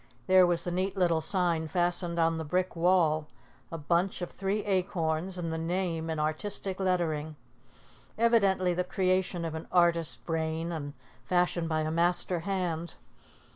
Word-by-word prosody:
There 185 +2 +6
was 175 -1 +2
the 175 - -3
neat 185 +3 -2
little 170 -3 +2
sign 170 -2 0
fastened 175 0 +1
on 165 -1 +2
the - - -3
brick 180 +4 -1
wall, 165 -3 +2 0.4
a 165 - -4
bunch 170 +5 0
of 175 - -5
three 195 +2 -2
acorns 180 -2 -1
and 165 -2 -3
the 160 - -3
name 165 -1 -2
in 160 -1 -2
artistic 190 +5 -2
lettering, 160 -5 -1 0.8
evidently 200 -6 +3
the 180 +1 0
creation 185 -1 0
of 160 - -4
an 160 0 -6
artist 170 -2 +2
brain 160 0 -2
and 145 -3 -5 0.3
fashioned 175 +2 0
by 155 -1 0
a 155 0 -2
master 175 +1 +1
hand. 175 -2 -3
175 Hz, 155 wpm, -29 LUFS, 160-185 Hz, 0.8 s, There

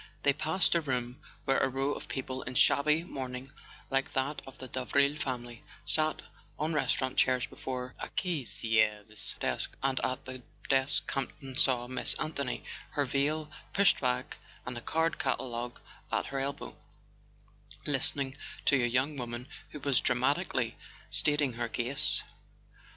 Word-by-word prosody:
They 140 - +5
passed 160 +5 +2
a 170 - +3
room 125 -1 -2 0.2
where 135 - +3
a 135 - +2
row 135 +2 0
of - - -7
people 130 -1 -4
in 130 - -5
shabby 150 +6 +4
mourning 130 -4 -5 0.4
like 135 +1 0
that 135 +3 -1
of 135 - -10
the 130 - -7
Davril 140 +4 +1
family 120 -4 -4 0.2
sat 155 0 +3 0.3
on 155 +2 0
restaurant 130 -3 +1
chairs 130 -1 +4
before 125 -1 -5
a - - -4
caissiere's 110 - +1
desk; - - -2
and 135 -1 +2
at 130 +1 -1
the 130 0 -7 0.3
desk 140 +2 +3
Campton 135 -1 -3
saw 125 -2 +3
Miss 130 0 +2
Anthony, 140 -4 -2 0.3
her 145 - +1
veil 150 +3 0 0.2
pushed 200 -2 +5
back 60 0 -1 0.3
and 125 - -3
a 120 - -5
card 160 +6 0
catalogue 125 -2 -2 0.3
at - - +1
her 135 - -3
elbow, 140 +1 -4 1.1
listening 135 -1 +3 0.3
to 135 -4 +4
a - - +3
young 130 +5 +1
woman 120 +1 -4 0.2
who 150 - -8
was 140 -3 +3
dramatically 130 -1 +1 0.3
stating 145 -3 +3
her 120 0 -2
case. 125 +4 +3
135 Hz, 145 wpm, -31 LUFS, 125-145 Hz, 1.1 s, They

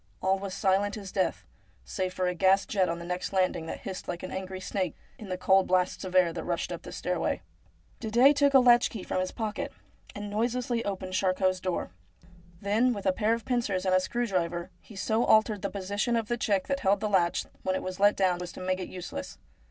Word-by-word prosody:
All 190 +1 +1
was 195 -1 -5
silent 200 +2 +1
as 195 -3 -8
death, 190 - -1 0.4
save 185 -2 -2
for 185 0 -2
a 180 - 0
gas 190 +2 +3
jet 190 -4 +1
on 170 - -2
the 170 - -8
next 180 +1 -3
landing 185 -3 +1
that - - -6
hissed 190 -1 -6
like 175 - -4
an 185 - -5
angry 190 0 -5
snake, 185 -2 -2 0.2
in 210 - -9
the 185 - -2
cold 190 +1 +4
blasts 185 +1 +1
of 185 -1 -6
air 180 -2 +5
that - - -5
rushed - - -2
up - - -5
the - - -9
stairway. - - -2 0.6
Didet 240 +6 +5
took 285 -1 +3
a - - +10
latch 240 -1 +5
key 210 -5 -7
from - - -2
his 185 0 -1
pocket, 220 -2 -3 0.4
and 205 0 -5
noiselessly 235 +3 -1
opened 190 -2 -4
Charcot's 185 0 +1
door. 185 - -3 0.7
Then, 220 +5 +2
with 200 - -7
a 190 - +3
pair 220 +3 +2
of 230 -2 -9
pincers 225 -7 0
and 185 - +2
a 185 - +6
screw 240 +6 -1
driver, 175 -4 -2
he 215 - -14
so 220 +4 +1
altered 215 -3 +4
the 200 - -2
position 205 +4 -1
of 225 -2 -1
the 240 - +1
check 200 -5 0
that 275 0 -1
held 200 -2 +2
the 215 - -1
latch 180 -4 +2 0.2
when 185 0 0
it - - -3
was 185 +1 -5
let 205 +1 +5
down 180 -2 +1
as 180 - -5
to - - -9
make 185 0 -1
it 185 - -5
useless. 180 - -7
195 Hz, 230 wpm, -28 LUFS, 185-215 Hz, 0.7 s, a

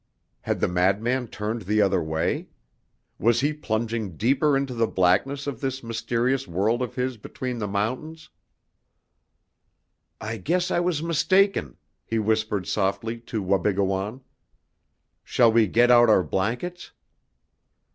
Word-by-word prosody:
Had - - -2
the - - +2
madman 100 +8 +1
turned 110 +2 -4
the 105 +2 0
other 95 -3 +3
way? 80 0 -2 0.7
Was 115 +2 +3
he 145 +2 +1
plunging 110 - -3
deeper 135 +5 +2
into 135 -2 -2
the 115 -1 +1
blackness 100 +11 +1
of 140 -5 -5
this 135 -1 -3
mysterious 115 +3 -1
world 100 +8 0
of 125 - -4
his 125 -1 -2
between 125 +3 -5
the 105 - -2
mountains? 125 +11 -3 1.9
"I 110 +1 -4
guess 175 - -1
I - - +2
was 175 -3 0
mistaken," 170 - +2 0.3
he 115 - -3
whispered 110 -2 0
softly 110 +5 -1
to 110 -3 -2
Wabigoon. 100 +4 0 1.0
"Shall 115 -2 +3
we 110 -1 +4
get 120 +6 +4
out 120 -1 +6
our 100 -4 +5
blankets?" 120 - -3
115 Hz, 130 wpm, -25 LUFS, 100-130 Hz, 1.9 s, out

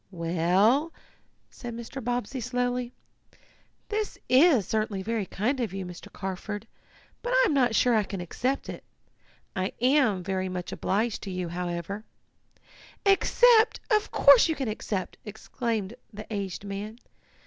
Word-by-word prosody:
"Well," 185 - +2 0.6
said 240 -2 -7
Mr. 235 +3 -7
Bobbsey 245 +2 -2
slowly, 245 0 -1 1.0
"this 425 -1 -2
is 260 - +5
certainly 215 -2 -1
very 220 -2 -2
kind 245 +10 -1
of, 225 -6 -2
you, 195 -1 -4
Mr. 180 -1 -10
Carford, 200 +3 -5 0.6
but - - -2
I - - +5
am 380 - +1
not 250 -5 +3
sure 245 +2 +4
I 220 - +4
can 195 -1 -5
accept 250 +10 -2
it. - - -7 0.7
I 185 +1 -1
am 250 -7 +3
very 190 0 -2
much 180 -1 -5
obliged 215 +3 -1
to 200 - -6
you, 180 -2 -3
however 175 +3 -4 0.5
" - - -24
"Accept! 480 -2 +4
Of 425 0 +3
course 280 +2 +6
you 320 - +1
can 270 -3 -3
accept!" 210 -3 -3
exclaimed 220 -1 -3 0.2
the 210 0 -8
aged 195 -2 -4
man. 205 +3 -5
220 Hz, 145 wpm, -27 LUFS, 190-255 Hz, 1.0 s, course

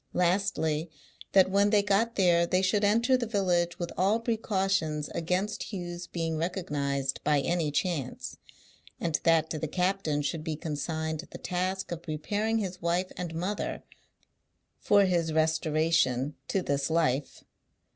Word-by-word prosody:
Lastly, 175 -3 +1 0.4
that 190 -1 +5
when 200 +1 +4
they 205 -1 +4
got 215 +3 +1
there 170 -3 +4
they 185 +2 +2
should 200 +2 +2
enter 230 +5 +4
the 245 -2 -1
village 175 -5 +1
with 175 -2 -4
all 200 +5 +2
precautions 195 -9 0
against 185 +6 -2
Hugh's 175 -3 -5
being 165 -2 -2
recognised 145 -6 -2
by 150 -1 +3
any 170 0 0
chance; 145 -3 -2 0.6
and 160 -3 0
that 165 -1 +3
to 155 - -2
the 160 - -2
captain 180 -3 0
should 155 +2 -2
be 160 -1 -2
consigned 160 +1 -3
the - - -8
task 185 +1 -2
of 170 -1 -4
preparing 205 +8 -1
his 190 -4 -3
wife 175 +2 0
and 175 -2 -5
mother 185 +5 -3 1.0
for 200 -1 +4
his 170 -3 +1
restoration 155 -4 +2
to 190 - 0
this 140 -1 0
life. 155 -4 0
175 Hz, 145 wpm, -29 LUFS, 155-195 Hz, 1.0 s, that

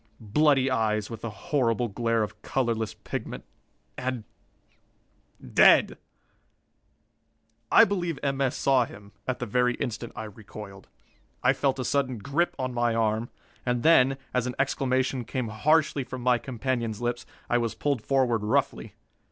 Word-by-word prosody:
Bloody 135 +4 +3
eyes, 110 -3 0
with 115 -1 -8
a 115 - -2
horrible 120 -3 0
glare 115 +1 0
of 105 0 -7
colorless 115 -4 -1
pigment. - - -6 0.6
And 130 -3 -3 1.3
dead. - - +6 1.8
I - - +8
believe 175 -6 -2
M. 140 -1 -1
S. 135 0 0
saw 130 -3 +3
him 100 -2 -13 0.2
at 130 - -1
the 125 - -4
very 125 +2 +1
instant 120 0 -4
I 110 - -5
recoiled. 105 -2 -10 0.6
I 125 +2 +5
felt 135 0 0
a 130 - -3
sudden 135 -3 0
grip 140 - -1
on 130 -1 -3
my 120 -1 +1
arm; 110 +1 0 0.3
and 125 -1 -1
then, 135 -5 +5 0.2
as 125 -1 0
an 125 - -4
exclamation 130 -1 0
came 125 -1 -3
harshly 145 +5 +2
from 125 -1 -7
my 125 -1 +3
companion's 120 -4 -3
lips, 120 0 -3 0.2
I 120 - +2
was 115 -2 -2
pulled 140 -5 -1
forward 125 -3 +1
roughly. 105 - -1
125 Hz, 145 wpm, -27 LUFS, 115-135 Hz, 1.8 s, I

